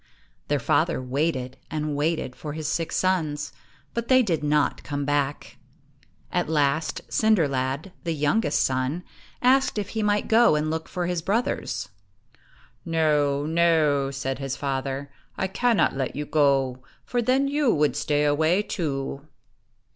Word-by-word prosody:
Their 145 - +1
father 160 +5 +1
waited 130 0 -2
and 150 -1 -2
waited 150 -3 -1
for 150 -2 -6
his 155 -1 -4
six 165 +1 -1
sons, 155 -5 0 0.4
but 235 0 -3
they 260 -1 +5
did 165 -8 -1
not 150 0 +1
come 145 -1 -3
back. 145 0 -1 0.7
At - - 0
last, 155 0 +1
Cinder 215 -8 +3
lad, 135 +6 -2
the 165 - -1
youngest 150 +10 +1
son, 130 +6 -1 0.4
asked 265 -1 +3
if 205 -2 -2
he 220 - -2
might 210 -1 +1
go 225 -5 +5
and 155 +1 0
look 160 0 -4
for 180 -1 -2
his 175 -1 -1
brothers. 165 - -1 0.9
"No, 150 -3 +1
no," 155 -4 +3
said 135 -1 -3
his 135 -2 -3
father; 135 0 -3 0.3
"I - - 0
cannot 230 - +2
let 135 -2 -2
you 150 +1 -3
go, 135 -4 +2 0.2
for 245 - 0
then 260 +4 +2
you 285 -3 +2
would 150 -1 +2
stay 150 0 +1
away 160 +7 +2
too." 140 -6 -3
150 Hz, 145 wpm, -25 LUFS, 140-180 Hz, 0.9 s, they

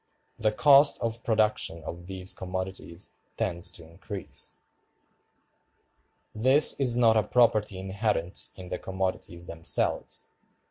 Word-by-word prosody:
The 110 -1 +2
cost 140 +4 +5
of 115 0 -3
production 110 -7 0
of 85 +2 -8
these 95 -1 -3
commodities 95 -1 -6 0.3
tends 85 0 -2
to 80 -2 -10
increase. 95 +4 -8 1.8
This 130 +7 +6
is 125 -3 +2
not 115 -2 +4
a - - +5
property 110 -3 +2
inherent 95 -2 -1
in 90 -1 -10
the - - -4
commodities 95 -2 -4
themselves. 85 -1 -1
95 Hz, 110 wpm, -27 LUFS, 90-115 Hz, 1.8 s, This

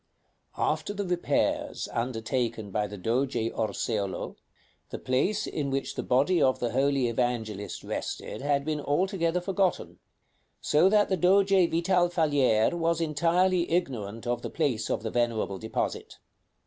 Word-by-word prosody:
"After 205 - -1
the 205 0 -2
repairs 180 -1 -1
undertaken 115 -2 -2
by 105 +1 0
the 105 0 -8
Doge 125 +8 -1 0.2
Orseolo, 105 -2 -2 0.5
the - - -5
place 195 +12 0
in 145 -3 -3
which 135 0 -2
the - - -3
body 145 +8 +2
of 130 -1 +3
the 120 - -2
holy 135 -1 +2
Evangelist 115 -4 -2
rested - - -5
had 140 0 0
been 155 -1 -2
altogether 170 +3 0
forgotten; 190 0 -1 0.6
so 155 +5 +3
that 210 0 +3
the 190 - +1
Doge 195 +3 +4
Vital 175 -1 +3
Falier 145 -10 +2
was 165 -1 0
entirely 170 +3 +2
ignorant 115 - -2
of 120 0 -1
the - - -5
place 130 -9 -1
of - - -1
the 110 - -3
venerable 115 -5 -1
deposit. 110 - -4
140 Hz, 140 wpm, -28 LUFS, 115-175 Hz, 0.6 s, Doge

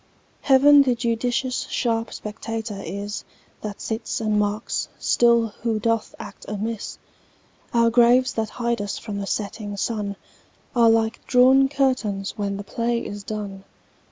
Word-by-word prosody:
Heaven 285 +1 +7
the 255 -3 +2
judicious 240 +2 -1
sharp 230 -2 -1
spectator 215 -1 -5
is, 200 +4 -5 0.4
That 210 -1 -6
sits 220 0 -3
and 215 -2 +1
marks 210 +1 -1
still 235 -1 +3
who 225 -2 0
doth 230 0 -1
act 210 -3 -10
amiss. 210 +1 -4 0.7
Our 230 -1 +3
graves 245 +2 +5
that 220 -1 -2
hide 235 -2 -2
us 205 -1 -3
from 205 -3 -5
the 200 - -4
setting 205 0 -3
sun 205 -1 -2 0.6
Are 235 -1 +6
like 225 0 +1
drawn 265 +2 +5
curtains 255 -8 0
when 200 -1 -2
the 200 - -6
play 235 +3 -2
is 205 0 -6
done. 200 -2 -6
225 Hz, 140 wpm, -23 LUFS, 205-235 Hz, 0.7 s, Heaven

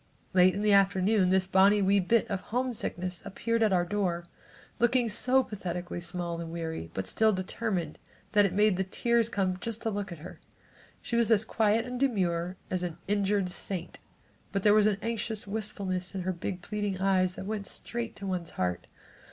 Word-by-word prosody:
Late 185 0 +5
in 200 - -2
the 210 -1 +4
afternoon 195 0 +4
this 190 0 +3
bonnie 195 +2 +5
wee 200 +1 +4
bit 230 +5 +2
of 200 -4 -2
homesickness 215 -7 -3
appeared 230 +4 -2
at 220 -2 +4
our 175 -2 +3
door, 175 -3 -1 0.5
looking 240 0 +3
so 255 +5 +3
pathetically 180 -5 -5
small 170 -1 -3
and 165 -1 -6
weary, 160 - -4
but 95 - -2
still 220 - +3
determined, 185 -3 -3 0.3
that 210 -1 +5
it 200 - +2
made 210 -1 +3
the 190 - +1
tears 235 +4 +1
come 185 -4 -1
just 230 0 -4
to 225 - 0
look 200 -1 -4
at 170 - -6
her. 155 - -10 0.6
She 235 - -2
was 235 -1 +3
as 220 -1 +4
quiet 220 +1 +2
and 250 0 -5
demure 185 -8 0
as 185 -1 0
an 175 -2 -4
injured 200 -2 +1
saint 180 -1 -5 0.5
but 195 -1 -1
there 210 - +6
was 215 0 +5
an 205 -2 +1
anxious 225 -2 -2
wistfulness 195 -3 -3
in 190 - -2
her 185 +1 -1
big 180 +1 -5
pleading 205 -2 -2
eyes 185 -1 +2
that 190 - -7
went 205 -1 -4
straight 235 -1 -4
to 200 - -8
one's 180 -3 -3
heart. 90 -1 -1
195 Hz, 190 wpm, -29 LUFS, 180-215 Hz, 0.6 s, there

